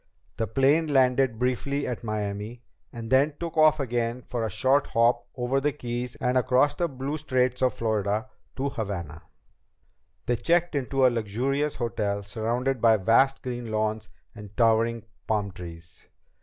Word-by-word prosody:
The 115 - -1
plane 140 - +3
landed 130 -3 +3
briefly 130 +3 -1
at 125 -1 -4
Miami, 105 +2 -4 0.3
and 115 -1 -8
then 140 +3 +3
took 170 -1 -5
off 155 -1 +5
again 120 -2 -2
for 120 - -4
the 110 - -1
short 135 +7 +2
hop 115 +1 +2
over 130 +2 0
the 150 +1 +1
Keys 120 -3 -5
and 125 0 +1
across 130 +3 +3
the 175 - -1
blue 135 +2 -4
Straits 130 -4 0
of 130 -1 +2
Florida 110 -1 -1 0.3
to 140 +1 -1
Havana. 90 - -5 1.0
They 120 - 0
checked 170 +7 +1
into 135 -1 +1
a - - +7
luxurious 130 +7 -1
hotel, 100 -3 -2
surrounded 120 +4 -2
by 115 -2 +5
vast 115 +7 +3
green 120 -2 -5
lawns 110 0 -1 0.2
and 105 -2 -12
towering 115 -1 +2 0.2
palm 105 -2 0
trees. 85 -2 -10
120 Hz, 155 wpm, -26 LUFS, 110-135 Hz, 1.0 s, a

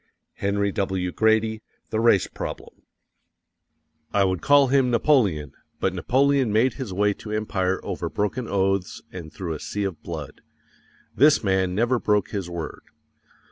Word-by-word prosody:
_ - - -44 0.4
HENRY 100 0 0
W. 95 -2 -2
GRADY, 110 +1 +2 0.3
The 110 - 0
Race 115 -5 +4
Problem.... - - -8 1.3
I 100 - +3
WOULD 95 -2 0
CALL 145 -1 +5
HIM 135 -1 +3
NAPOLEON, 110 - +2 0.3
but 95 - 0
Napoleon 130 - +2
made 115 +4 +3
his 130 -8 -6
way 100 +2 +2
to 105 - -10
empire 95 -3 -1
over - - -4
broken 115 +4 -2
oaths 95 -1 -1
and 85 -4 -8
through 85 -4 -5
a 75 - -6
sea 105 - -4
of 95 -6 -4
blood. 80 -5 -7 0.7
This 150 -2 +5
man 95 -2 +1
never 120 +3 +2
broke 105 -5 +1
his 95 -4 -4
word. 85 -3 -6
100 Hz, 150 wpm, -24 LUFS, 95-115 Hz, 1.3 s, CALL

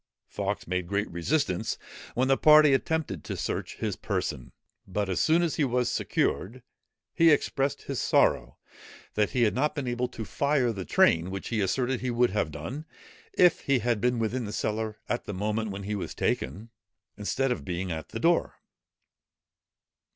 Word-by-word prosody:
Fawkes - - -3
made 90 0 -2
great 100 +2 -1
resistance, 90 - 0 0.4
when 130 +2 +2
the 135 - +4
party 150 0 +7
attempted 140 - -1
to - - -5
search - - -3
his - - -2
person; 60 - -3 0.4
but 100 +1 -1
as 90 - 0
soon 165 +2 +4
as 165 - -1
he 150 - +2
was 125 -2 +1
secured, 120 +6 -1 0.5
he 165 -1 +5
expressed 140 -2 +1
his 140 -3 -3
sorrow, - - +2 0.6
that 105 -1 +1
he 125 -2 +1
had 110 - +3
not 150 +4 0
been 140 -4 -3
able 120 +1 -1
to 110 - -7
fire 140 -1 +1
the 95 -3 -5
train, 85 +2 +3
which 95 0 -5
he 110 -3 0
asserted 125 +6 0
he 130 - -2
would 120 -1 +2
have 95 -6 0
done, 85 - -6 0.5
if 180 -2 +5
he 140 -1 +2
had 120 -2 0
been 125 +1 +2
within 115 +2 -1
the 105 - -5
cellar 110 0 -2
at 120 - -2
the 105 - -5
moment 105 +3 -1
when 100 0 -6
he 105 +2 -3
was 100 - -4
taken, 100 - -2 0.4
instead 125 +6 -1
of 125 - -2
being 90 0 -3
at 80 -1 -5
the - - -5
door. - - +2
115 Hz, 180 wpm, -28 LUFS, 95-135 Hz, 0.6 s, party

